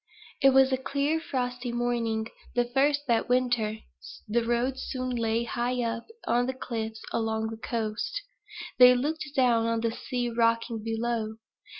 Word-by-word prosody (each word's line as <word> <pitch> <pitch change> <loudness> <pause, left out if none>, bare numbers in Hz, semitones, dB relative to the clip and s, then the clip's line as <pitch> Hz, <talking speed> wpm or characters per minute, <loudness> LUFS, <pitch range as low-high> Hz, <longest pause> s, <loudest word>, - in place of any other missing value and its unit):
If 270 -1 +6
was 265 0 +6
a 260 - +2
clear, 280 +4 0
frosty 250 -4 -3
morning; 235 -2 0 0.3
the 245 0 +3
first 280 +4 +1
that 235 -2 +1
winter. 245 -4 +1 0.5
The 230 +2 +1
road 240 +3 0
soon 255 -1 -3
lay 230 -1 0
high 240 +1 -1
up 230 0 -3 0.2
on 245 +1 +2
the 260 - -2
cliffs 225 -3 -5
along 220 -1 -1
the 225 - -6
coast. 225 - -3 0.6
They 250 0 +9
looked 305 +5 -2
down 235 -3 +3
on 230 0 0
the 230 -1 0
sea 245 +1 -3
rocking 230 -1 +1
below. 225 -1 -2
240 Hz, 155 wpm, -28 LUFS, 230-255 Hz, 0.6 s, They